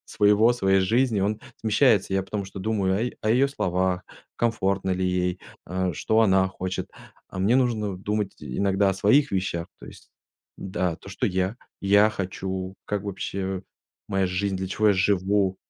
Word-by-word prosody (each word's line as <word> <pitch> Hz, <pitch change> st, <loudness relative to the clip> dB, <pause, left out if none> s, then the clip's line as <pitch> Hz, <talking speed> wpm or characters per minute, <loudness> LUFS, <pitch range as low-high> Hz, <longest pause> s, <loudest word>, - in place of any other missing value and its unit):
своего, 105 Hz, +3 st, +4 dB
своей 95 Hz, -5 st, +2 dB
жизни 115 Hz, +1 st, +2 dB
он 105 Hz, +2 st, 0 dB, 0.2 s
смещается. 110 Hz, -3 st, +3 dB
Я 95 Hz, -, +1 dB
потому 100 Hz, +1 st, -4 dB
что 95 Hz, 0 st, -8 dB
думаю 95 Hz, -3 st, 0 dB
о 110 Hz, -, 0 dB
е 125 Hz, -, -3 dB
о 110 Hz, -, +1 dB
ее 135 Hz, +4 st, +4 dB
словах, 90 Hz, -7 st, -1 dB, 0.3 s
комфортно 100 Hz, -5 st, 0 dB
ли 95 Hz, 0 st, 0 dB
ей, 90 Hz, 0 st, -1 dB, 0.3 s
а 95 Hz, 0 st, -1 dB
что 110 Hz, +7 st, +1 dB
она 95 Hz, -2 st, +4 dB
хочет. 95 Hz, -1 st, -4 dB, 0.4 s
А -, -, -8 dB
мне 110 Hz, +7 st, +3 dB
нужно 110 Hz, -7 st, 0 dB
думать 105 Hz, 0 st, -2 dB
иногда 95 Hz, +8 st, +1 dB
о -, -, -2 dB
своих 105 Hz, +9 st, +3 dB
вещах, 90 Hz, -3 st, -1 dB
то -, -, -11 dB
есть -, -, -14 dB, 0.5 s
Да, 90 Hz, -2 st, -2 dB
то 95 Hz, -, -14 dB
что -, -, -1 dB
я 95 Hz, +3 st, -1 dB, 0.2 s
я 100 Hz, +2 st, +5 dB
хочу, 95 Hz, -1 st, -4 dB
как 105 Hz, -1 st, -2 dB
вообще 95 Hz, -1 st, -4 dB, 0.5 s
моя 95 Hz, -1 st, +1 dB
жизнь, 95 Hz, +2 st, -1 dB
для 95 Hz, 0 st, -4 dB
чего 105 Hz, +2 st, +2 dB
я -, -, +6 dB
живу. 95 Hz, 0 st, +2 dB
95 Hz, 170 wpm, -25 LUFS, 95-105 Hz, 0.5 s, я